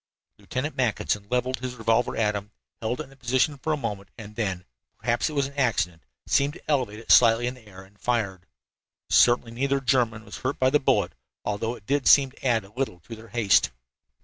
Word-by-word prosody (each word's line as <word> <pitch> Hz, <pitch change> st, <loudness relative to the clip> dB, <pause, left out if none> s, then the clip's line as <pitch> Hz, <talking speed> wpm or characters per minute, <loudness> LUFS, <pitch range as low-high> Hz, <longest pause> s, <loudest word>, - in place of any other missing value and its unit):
Lieutenant 135 Hz, +4 st, -4 dB
Mackinson 110 Hz, -5 st, -1 dB
leveled 125 Hz, +1 st, 0 dB
his 125 Hz, 0 st, -5 dB
revolver 115 Hz, +1 st, +1 dB
at 105 Hz, -2 st, +2 dB
them, 105 Hz, 0 st, -6 dB, 0.3 s
held 115 Hz, +2 st, -2 dB
it -, -, -2 dB
in -, -, -16 dB
that 135 Hz, -, -19 dB
position 130 Hz, +4 st, +1 dB
for 155 Hz, -, -2 dB
a 155 Hz, -, +1 dB
moment, 100 Hz, -7 st, -5 dB
and 105 Hz, -2 st, -10 dB
then 95 Hz, -5 st, -2 dB, 0.3 s
perhaps 120 Hz, +6 st, 0 dB
it -, -, -7 dB
was 140 Hz, -2 st, +1 dB
an 140 Hz, -, -8 dB
accident 110 Hz, -11 st, 0 dB, 0.2 s
seemed 140 Hz, +1 st, +2 dB
to -, -, -14 dB
elevate 125 Hz, -8 st, 0 dB
it 115 Hz, -, -3 dB
slightly 115 Hz, 0 st, +6 dB
in 125 Hz, -, -1 dB
the 125 Hz, -4 st, -17 dB
air 95 Hz, -2 st, -12 dB
and 100 Hz, +2 st, -22 dB
fired. 100 Hz, -7 st, -1 dB, 0.6 s
Certainly 120 Hz, -1 st, +4 dB
neither 140 Hz, +3 st, 0 dB
German 120 Hz, -4 st, +1 dB
was -, -, -8 dB
hurt 130 Hz, +2 st, -2 dB
by 130 Hz, 0 st, +3 dB
the 150 Hz, -, +4 dB
bullet, 135 Hz, -, +1 dB, 0.3 s
although 110 Hz, +3 st, -2 dB
it 105 Hz, -, -16 dB
did 140 Hz, +2 st, 0 dB
seem 135 Hz, -2 st, +6 dB
to -, -, -20 dB
add 115 Hz, -5 st, +2 dB
a 100 Hz, -, -18 dB
little 125 Hz, -8 st, -3 dB
to 115 Hz, -, -9 dB
their 110 Hz, +1 st, -13 dB
haste. 110 Hz, -2 st, +3 dB
120 Hz, 215 wpm, -25 LUFS, 105-130 Hz, 0.6 s, slightly